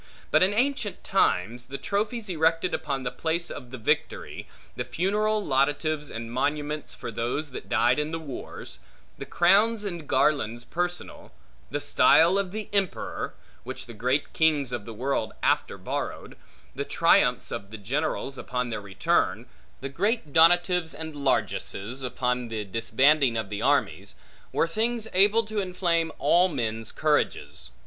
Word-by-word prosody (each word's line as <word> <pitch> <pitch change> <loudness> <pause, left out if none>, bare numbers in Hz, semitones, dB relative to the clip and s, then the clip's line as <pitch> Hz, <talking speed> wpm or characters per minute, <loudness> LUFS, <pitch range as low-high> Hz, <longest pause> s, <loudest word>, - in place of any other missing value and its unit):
But - - +5
in 185 +2 +4
ancient 240 -1 -1
times, 120 - +1
the 140 +1 -5
trophies 210 - -2
erected 165 0 +1
upon 135 -2 -2
the 125 - -2
place 165 +1 -2
of 125 -4 -8
the 130 - -7
victory; 110 - -2 0.3
the - - -2
funeral 210 +4 0
laudatives 145 +2 0
and 115 0 -6
monuments 145 +3 -2
for 120 - -6
those 125 +6 -3
that - - -8
died 120 +2 +3
in 150 +1 -1
the 165 - -3
wars; 150 -5 -8 0.4
the - - -6
crowns 210 +5 +3
and 170 -7 -5
garlands 120 -6 +1
personal; 175 +5 -4 0.4
the - - -2
style 170 +5 +5
of 195 0 -3 0.2
emperor, 195 -3 -1 0.3
which - - -6
the 120 - -10
great 125 +6 -1
kings 150 -5 +2
of 115 -4 -4
the 115 - -7
world 135 +5 -1
after - - +1
borrowed; - - -5 0.4
the - - -3
triumphs - - +3
of 100 - -5
the 110 - -8
generals, 135 +4 -2
upon 125 -1 -3
their 105 - -3
return; 100 -2 0 0.4
the 135 - -4
great 180 - -1
donatives 175 +1 +4
and 160 -1 -6
largesses, 130 -3 -1
upon 125 -1 -1
the 110 -2 -4
disbanding 115 +5 +3
of 110 -2 -4
the 100 - -3
armies; - - 0 0.4
were - - +1
things 225 +5 -1
able 205 +4 +5
to 215 -1 -3
inflame 175 -3 0
all 180 +2 +4
men's 115 - -3
courages. 150 - -1
150 Hz, 150 wpm, -26 LUFS, 125-180 Hz, 0.4 s, But